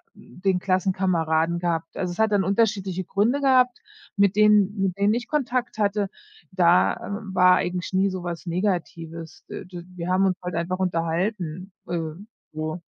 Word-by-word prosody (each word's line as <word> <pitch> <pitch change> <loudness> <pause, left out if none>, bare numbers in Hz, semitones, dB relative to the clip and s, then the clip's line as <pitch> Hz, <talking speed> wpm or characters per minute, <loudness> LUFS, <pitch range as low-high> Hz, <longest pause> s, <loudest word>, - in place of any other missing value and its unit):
den 185 0 -2
Klassenkameraden 180 -3 +1
gehabt. 165 -2 -2
Also, 180 -1 -2
es 175 - -9
hat 220 -1 +3
dann 200 -1 +3
unterschiedliche 195 -2 0
Gründe 220 +10 +1
gehabt, 255 -3 +3 0.4
mit 200 0 +3
denen 210 -1 +4
mit 195 -1 0
wem 200 +2 +3
ich 240 -1 -3
Kontakt 255 -6 -1
hatte. 205 -1 0 0.4
Da, 180 -1 +4
äh, - - -11 0.4
war 180 -1 +6
eigentlich 180 +1 -2
nie 195 +1 +3
so 185 -1 -5
was 175 0 -5
Negatives. 170 -3 -3
Äh, - - -7
d 175 -1 -9
wir 175 0 -4
haben 190 +1 +3
uns 185 - +2
halt 180 -1 -4
einfach 175 +2 -2
unterhalten, 180 +1 -2 0.2
ähm, 170 +4 -4 0.2
so. 155 +2 -4
185 Hz, 160 wpm, -24 LUFS, 170-200 Hz, 0.4 s, war